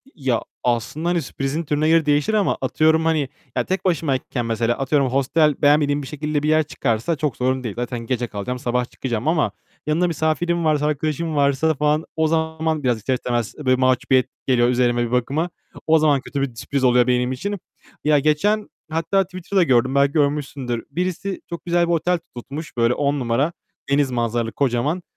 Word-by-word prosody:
ya 130 -7 0 0.2
aslında 125 +8 -1
hani 175 -1 +1
sürprizin 135 +3 -3
türüne 150 +1 0
göre 165 -1 +4
değişir 145 +7 +2
ama 210 -2 +2
atıyorum 160 +1 +2
hani 155 -4 +1 0.3
ya - - +1
tek 190 +1 -2
başımayken 140 -7 -1
mesela 115 +1 0
atıyorum 135 0 +1
hostel 140 +3 +2
beğenmediğim 145 0 +3
bir 135 - -7
şekilde 150 0 -2
bir 150 - +1
yer 155 0 +4
çıkarsa 135 0 -1
çok 150 -4 -2
sorun 130 +1 0
değil. 110 -5 -4
Zaten 120 0 -3
gece 120 +1 -2
kalacağım, 115 +4 -4
sabah 125 0 0
çıkacağım 120 0 -3
ama 155 - +2 0.4
yanımda 165 +4 +2
misafirim 170 +1 0
varsa, 150 -1 +2
arkadaşım 155 +2 -1
varsa 140 +2 +2
falan 150 +2 +1
o 160 0 +2
zaman, 160 -1 -1
biraz 125 -3 +2
ister 110 +5 -1
istemez 120 -3 -2
böyle 130 -4 +2
mahcubiyet 130 0 +2 0.2
geliyor 120 -2 +3
üzerime 120 -1 +2
bir 115 - -6
bakıma, 140 +7 0 0.4
o 160 0 +5
zaman 150 -3 +3
kötü 140 +1 -4
bir 135 -4 -2
sürpriz 135 +4 -3
oluyor 125 -1 +4
benim 125 0 +1
için. 200 +10 -3 0.4
Ya 150 -1 +4
geçen, 200 +9 +1 0.2
hatta 165 +5 +1
Twitter'da 185 +1 -1
gördüm. 130 -2 +2
Belki 140 0 +4
görmüşsündür. 140 -5 -1
Birisi 185 +4 -3
çok 170 - -7
güzel 175 0 +2
bir 170 - +1
otel 175 +2 +1 0.2
tutmuş. 140 +4 -7
Böyle 115 +1 +3
10 145 +1 0
numara 130 +6 0 0.4
deniz 140 -1 +2
manzaralı, 120 -1 -1
kocaman. 140 +7 0
145 Hz, 180 wpm, -21 LUFS, 125-160 Hz, 0.4 s, o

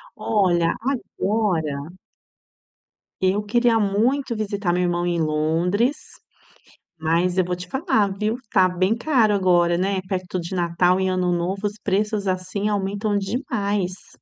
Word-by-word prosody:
Olha, 175 -6 +2 0.2
agora 185 - -1 1.3
eu 195 +3 +2
queria 235 +1 +2
muito 235 +6 +1
visitar 205 -4 -1
meu 180 0 +1
irmão 175 0 0
em 175 -1 0
Londres, 165 - +1 1.0
mas 170 +3 +1
eu - - +4
vou 180 0 -2
te 180 0 -9
falar, 265 - +1
viu, 215 +2 0 0.2
tá 185 -3 +5
bem 185 +5 +1
caro 235 -5 +2
agora, 175 -3 +3
né? 195 0 0
Perto 185 -1 -3
de 170 +2 -6
Natal 175 +1 +2
e 190 - +1
Ano 185 -1 0
Novo 185 +4 -2
os 205 - -1
preços, 205 0 0
assim, 185 +3 -1
aumentam 205 +1 -1
demais. 200 - -2
190 Hz, 135 wpm, -22 LUFS, 180-210 Hz, 1.3 s, tá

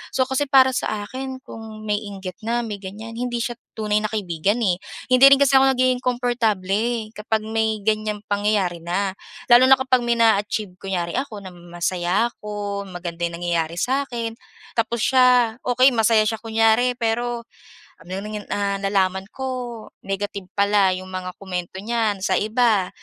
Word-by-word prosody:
So, 260 - +4
kasi 265 +2 +1
para 265 -1 +6
sa 205 -3 -2
akin 260 +1 -6
kung 220 -1 -9
may 205 0 +1
inggit 195 -3 -8
na, 235 +2 0
may 220 -3 -4
ganyan, 210 +4 -8
hindi 240 0 -2
siya 240 - -3 0.2
tunay 210 -1 +1
na 215 - -1
kaibigan 195 0 -1
eh. 180 -4 +1 0.3
Hindi 255 +1 +7
rin 275 - +8
kasi 280 -1 +3
ako 265 0 +6
nagiging 255 0 +2
komportable, 230 -3 0
kapag 215 0 -1
may 220 -1 0
ganyang 215 -1 0
pangyayari 205 -4 0
na. 190 +3 -1 0.4
Lalo 245 +2 +8
na 265 - +8
kapag 260 -1 +2
may 235 0 0
naa-achieve, 210 -3 +2
kunyari 175 -3 -2
ako 230 -7 -4
na - - -6
masaya 175 +3 -1
ako, 205 -3 -5
maganda 175 -1 -7
yung 170 0 -4
nangyayari 170 -1 -1
sa'kin, 245 -3 -1 0.4
tapos 230 0 0
siya 250 -3 +4
okey 255 +2 +4
masaya 225 -1 +4
siya 220 +1 -1
kunyari, 225 +2 +3
pero 235 0 -1 0.6
ano 180 - -13
nangan 210 0 -6
ah, 200 -1 -1
nalaman 190 -1 0
ko 265 0 -4 0.6
negative 195 0 -4
pala 200 -2 +3
'yong 185 0 -7
mga 185 -1 -5
komento 180 -2 -5
niyan 220 -2 0
sa 190 -1 +1
iba. 215 -4 +2
215 Hz, 160 wpm, -22 LUFS, 195-240 Hz, 0.6 s, rin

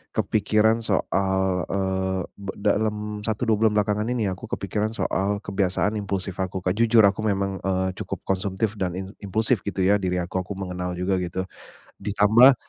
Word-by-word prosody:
kepikiran 110 +2 +2
soal, 95 -2 +1
eee, 95 -1 0
be 100 -1 -6
dalem 105 0 0
1, 110 +1 -1
2 110 - +4
bulan 105 - 0
belakangan 105 +1 0
ini 115 -4 0
ya, - - 0
aku 95 - -10
kepikiran 105 +2 -1
soal 100 -1 0
kebiasaan 100 +2 0
impulsif 95 -2 -3
aku 95 0 -3
Kak, 90 +1 +1
jujur 115 0 +5
aku 100 +2 0
memang, 100 -2 0
eee, 95 -1 0
cukup - - -4
konsumtif 95 +2 -1
dan 90 -2 -1
im 95 0 -6
impulsif 110 +4 +1
gitu 100 -1 -4
ya 100 +2 +5
diri 90 -2 -1
aku 90 +2 -3
aku 95 - -11
mengenal 90 -1 -4
juga 90 +2 0
gitu. 95 +1 -3 0.5
Ditambah 105 +6 +6
100 Hz, 170 wpm, -24 LUFS, 95-105 Hz, 0.5 s, Ditambah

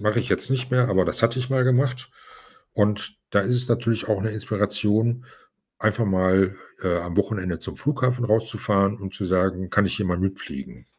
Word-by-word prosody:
mache 105 +2 +1
ich 120 - -1
jetzt - - -1
nicht 130 -1 -1
mehr, 125 0 +4
aber 95 -4 +3
das 90 - -2
hatte 115 +2 +3
ich 125 +1 -3
mal 130 -1 +3
gemacht 130 0 +1 0.6
und 105 - 0
da 100 - +4
ist 125 +5 +1
es 125 0 -1
natürlich 115 -1 0
auch 105 -3 +1
'ne 110 - -1
Inspiration, 105 +3 0 0.5
einfach 110 +2 +1
mal, 95 0 +3 0.3
äh, 90 -2 +1
am 85 0 -5
Wochenende 90 -6 -1
zum - - -8
Flughafen 130 -4 0
rauszufahren 105 -2 +1
und 95 -1 -7
zu 100 - -4
sagen: 95 0 0
„Kann 105 -1 +3
ich - - -1
hier 105 - -1
mal 90 -1 0
mitfliegen?“ 95 -7 -5
105 Hz, 190 wpm, -24 LUFS, 95-120 Hz, 0.6 s, mehr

